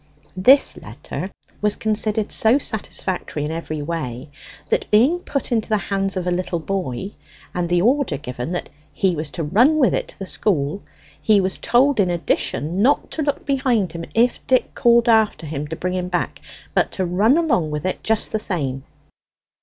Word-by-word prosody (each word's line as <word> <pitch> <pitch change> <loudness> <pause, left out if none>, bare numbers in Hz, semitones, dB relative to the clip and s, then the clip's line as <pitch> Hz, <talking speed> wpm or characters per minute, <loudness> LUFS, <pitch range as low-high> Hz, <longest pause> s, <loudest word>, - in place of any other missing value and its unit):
This 255 +10 +5
letter 190 - -7 0.3
was 210 0 +1
considered 215 -1 0
so 225 +4 +3
satisfactory 190 - -3
in 150 - -3
every 155 -2 -4
way 145 -4 -5 0.4
that, - - 0
being 255 +12 +4
put 280 -6 -3
into 225 -2 0
the 215 - +3
hands 195 -1 -1
of 180 - -2
a 180 - 0
little 175 0 -1
boy, 185 -1 -3 0.4
and 175 -1 -2
the 175 0 +2
order 270 +3 +2
given 125 +1 -5
that 175 - -4 0.2
he 185 -3 +1
was 155 -1 -3
to 165 - -4
run 235 - +4
with 270 -5 +3
it - - -1
to - - -11
the 195 - -6
school, 180 -3 0 0.4
he 215 -2 +4
was 190 0 -1
told 265 +1 +3
in 190 -3 +3
addition 170 0 -1
not 275 +6 +2
to 320 - -3
look 285 -1 -2
behind 255 - +1
him 165 0 -6
if 240 +2 +3
Dick 255 -1 +2
called 235 0 +4
after 220 -7 +3
him 150 -1 -4
to 160 - -5
bring 180 +2 -3
it 180 -1 -2
back, 175 -1 -2 0.3
but - - +2
to 190 - -1
run 205 - +3
along 290 - +1
with 150 +1 -4
it 185 - -2
just 220 -1 +1
the 220 - 0
same. 140 -10 -2
195 Hz, 185 wpm, -21 LUFS, 165-230 Hz, 0.4 s, This